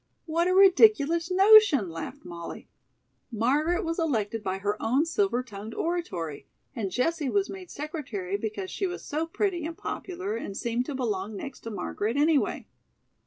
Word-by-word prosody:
"What 335 +1 +1
a 365 - +2
ridiculous 370 -4 +5
notion," 385 - +6
laughed 165 - -7
Molly. 170 -1 -8 0.6
"Margaret 295 - +1
was 330 +2 -2
elected 225 -9 0
by 190 -1 -2
her 205 +2 -1
own 260 +8 +2
silver 240 -6 0
tongued 215 -2 -9
oratory, 175 - -3 0.3
and 210 -5 -2
Jessie 295 - 0
was 395 +4 0
made 370 -2 -9
secretary 255 - -4
because 205 -2 -4
she 390 - -1
was 360 - -6
so 310 +3 -2
pretty 355 -1 -1
and 330 +2 -5
popular 380 +3 -4
and 195 - -6
seemed 240 +1 -1
to 290 - -4
belong 215 -5 -2
next 275 +4 -7
to 230 - -7
Margaret 215 +2 -3
anyway." 300 0 +2
280 Hz, 160 wpm, -27 LUFS, 210-340 Hz, 0.6 s, notion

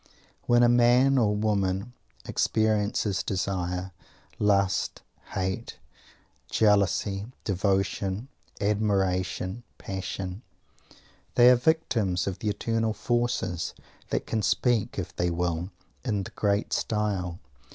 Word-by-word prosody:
When 120 0 +5
a - - +7
man 125 +3 +5
or 105 -3 +2
woman 105 +1 0 0.3
experiences 105 -2 +1
desire, 95 -1 -2 0.5
lust, 100 -2 +1 0.3
hate, 95 0 -3 0.7
jealousy, 100 -1 +2 0.2
devotion, 95 +2 0 0.3
admiration, 95 -1 0 0.2
passion, 95 0 -5 0.9
they 125 0 +8
are - - +7
victims 120 - +1
of 95 -1 -3
the 110 -3 -1
eternal 115 +1 0
forces, 120 -8 -1 0.3
that - - -1
can 110 - -1
speak, 120 +1 +1
if 90 -2 -4
they 90 - +1
will, 85 0 -1 0.3
in 105 -6 -1
"the - - -9
great 100 0 0
style." 100 -5 -1
100 Hz, 100 wpm, -27 LUFS, 95-115 Hz, 0.9 s, they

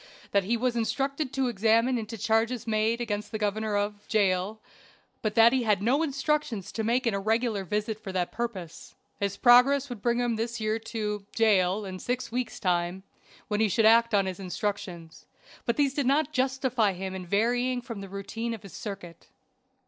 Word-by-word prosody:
That 200 -2 +2
he 235 +4 +1
was 245 +1 0
instructed 270 +5 -1
to 265 -1 +1
examine 230 +3 +2
into 225 +1 -6
charges 225 +3 +1
made 220 +1 +1
against 210 -3 -3
the 220 - -2
governor 210 0 -1
of 205 0 -3
Jail; 200 0 +1 0.6
but 215 -1 -2
that 230 +1 +7
he 260 - +2
had 215 -4 +2
no 260 +7 +3
instructions 275 - -1
to 220 - -3
make 240 +3 +1
an 230 - +2
irregular 215 +1 0
visit 210 +3 -2
for 195 - -7
that 180 -2 -1
purpose. 205 -8 -6 0.2
His 200 0 -2
progress 260 +4 +5
would 240 -5 -7
bring 235 +1 +1
him 240 -2 0
this 230 +1 -3
year 215 +1 0
to 210 -3 -4
Jail 205 -2 +3
in 185 -1 -6
six 245 +3 -3
weeks' 250 0 -3
time, 180 +1 0 0.4
when 210 -1 -1
he 220 -1 +3
should 225 +3 +2
act 230 0 +5
on 195 -1 +3
his 190 0 -4
instructions, 190 -4 -5 0.4
but 235 - 0
these 280 -2 +2
did 280 -3 0
not 295 +2 +2
justify 255 -5 +1
him 190 +1 -5
in 190 -1 -5
varying 245 +6 +1
from 230 -4 -7
the 195 - -8
routine 225 +4 -4
of 220 - -14
his 195 - -11
circuit. 195 -5 -8
220 Hz, 185 wpm, -28 LUFS, 200-240 Hz, 0.6 s, that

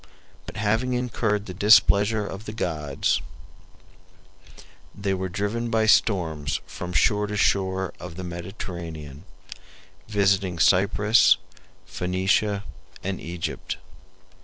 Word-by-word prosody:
But - - -8
having 110 +4 0
incurred 110 -4 -1
the 90 - -7
displeasure 105 +2 +4
of 100 +2 -7
the 105 - -6
gods 75 -9 -1 1.7
they 100 -1 -1
were 95 0 -3
driven 105 +6 -2
by 110 -1 +2
storms 80 - +2
from 90 0 -7
shore 105 +4 +2
to 105 0 -3
shore 95 -2 +1
of 90 -2 -8
the 90 - -6
Mediterranean, 85 -4 -7 0.8
visiting 100 -3 +1
Cyprus, 100 +5 +4 0.5
Phoenicia, 95 +3 0 0.4
and 95 0 -3
Egypt. 85 +1 -5
95 Hz, 105 wpm, -25 LUFS, 90-105 Hz, 1.7 s, displeasure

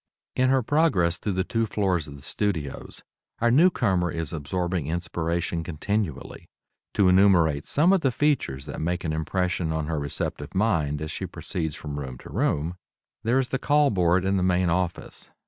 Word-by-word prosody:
In 130 0 +3
her 130 -1 +3
progress 105 - +2
through 105 - -2
the 95 0 0
two 115 +3 -1
floors 95 -7 0
of 70 - -9
the 70 - -13
studios 80 -9 -3 0.3
our 120 0 +2
newcomer 120 - +3
is 80 -2 -4
absorbing 85 +1 -2
inspiration 85 0 -2
continually. 85 -2 -3 0.5
To 100 -3 +4
enumerate 90 -6 +4
some 165 +6 +4
of 190 - +3
the 135 - +3
features 120 - 0
that 75 - -6
make 90 +3 -1
an 80 -2 -1
impression 90 +1 -1
on 80 -1 -1
her 80 -1 -2
receptive 70 +2 -4
mind 80 -8 +1
as 80 - -4
she - - -4
proceeds 80 -4 -4
from 75 -1 -6
room 65 -3 -6
to - - -12
room: 80 +5 0 0.4
There 115 +4 +1
is 130 -2 0
the 135 - -1
Call 145 0 +3
Board 90 -1 +2
in 95 +1 +2
the - - +1
main 90 -1 +2
office. 90 0 -3
90 Hz, 180 wpm, -25 LUFS, 80-105 Hz, 0.5 s, To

